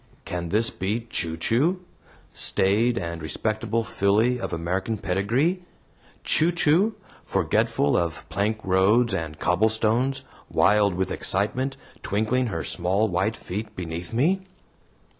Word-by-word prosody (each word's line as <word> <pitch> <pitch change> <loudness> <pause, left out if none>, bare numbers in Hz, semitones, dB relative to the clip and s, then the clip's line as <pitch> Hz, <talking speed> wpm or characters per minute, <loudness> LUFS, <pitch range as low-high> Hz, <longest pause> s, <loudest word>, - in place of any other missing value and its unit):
Can 85 -1 -4
this 110 +5 +2
be 105 +5 -2
"Chu 80 -1 -1
Chu," 145 - +1 0.5
staid 110 +5 +2
and 85 -3 -4
respectable 110 +7 -1
filly 110 +5 +1
of - - -4
American 95 +6 -2
pedigree 115 - 0 0.6
Chu 165 +3 +3
Chu, 175 +6 +2 0.3
forgetful 70 - +1
of 85 -2 -2
plank 105 +2 -1
roads 100 +5 +3
and 80 -4 -3
cobblestones, 110 +8 +1 0.3
wild 100 -1 +3
with 95 +1 -1
excitement, 125 +8 0 0.2
twinkling 110 +5 0
her 100 - -3
small 95 +5 0
white 95 +5 0
feet 105 +4 -6
beneath 85 -1 -6
me? 160 +12 +2
105 Hz, 120 wpm, -25 LUFS, 95-120 Hz, 0.6 s, Chu